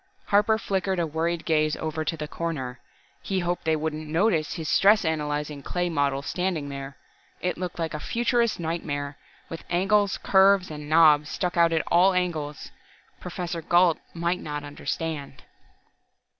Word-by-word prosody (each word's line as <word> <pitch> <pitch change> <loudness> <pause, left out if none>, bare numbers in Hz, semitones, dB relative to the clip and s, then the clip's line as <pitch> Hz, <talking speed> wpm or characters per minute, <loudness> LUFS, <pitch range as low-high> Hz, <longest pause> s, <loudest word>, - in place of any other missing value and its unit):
Harper 210 +2 +4
flickered 190 -2 -1
a 170 - +1
worried 165 +2 -2
glance 155 -2 +2
over 155 0 -3
to 160 +2 -2
the 150 -1 -4
corner. 135 -7 -4 0.4
He 195 - -2
hoped 175 0 -2
they 160 0 +3
wouldn't 155 0 -3
notice 165 -1 +1
his 160 -3 -5
stress 200 +2 +4
analyzing 150 -2 -2
clay 175 +4 -2
model 140 -3 0
standing 180 -5 -2
there. 140 -1 -7 0.4
It 180 - -1
looked 180 0 -5
like 165 -1 -2
a 150 - -3
futurist's 235 - +1
nightmare, 145 -4 -3 0.3
with 165 - -8
angles, 195 +3 +2
curves 190 -2 +4
and 150 -1 -7
knobs 155 -2 +5
stuck 180 -1 -2
out 170 -1 +4
at 160 -1 0
all 185 +3 +4
angles. 155 -5 -2 0.5
Professor 175 -1 -5
Gault 175 0 +3 0.2
might 170 +2 0
not 150 -1 -5
understand.... 145 -1 -5
165 Hz, 155 wpm, -26 LUFS, 150-180 Hz, 0.5 s, knobs